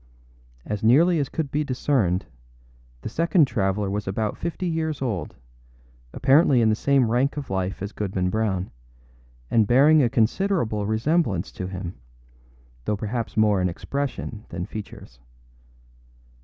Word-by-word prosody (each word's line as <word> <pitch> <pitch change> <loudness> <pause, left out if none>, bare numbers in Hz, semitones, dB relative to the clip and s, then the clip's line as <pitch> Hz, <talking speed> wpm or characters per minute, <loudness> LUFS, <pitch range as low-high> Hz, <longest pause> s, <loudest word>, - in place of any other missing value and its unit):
As 105 -1 -3
nearly 160 +9 +5
as 140 - -1
could 150 -4 -3
be 150 +1 0
discerned, 125 -9 0 0.8
the - - -4
second 165 - +3
traveller 100 -5 -1
was 100 +1 -3
about 105 +2 -1
fifty 170 +2 -4
years 160 -3 -2
old, 105 - -3 0.8
apparently 135 -1 +4
in 115 -2 +4
the 110 - +3
same 135 -1 +2
rank 130 +5 +1
of 140 -8 -5
life 95 0 -2
as 100 - -4
Goodman 95 -3 -2
Brown, 100 -4 -1 0.8
and 110 -3 +3
bearing 145 +6 +6
a 120 - +3
considerable 115 - 0
resemblance 110 - 0
to 90 - -5
him, 90 -1 -6 0.9
though 105 - 0
perhaps 110 +2 -4
more 105 -3 +3
in 90 - +1
expression 125 +1 -4
than 85 +1 -4
features. 100 - -9
110 Hz, 140 wpm, -24 LUFS, 100-140 Hz, 0.9 s, bearing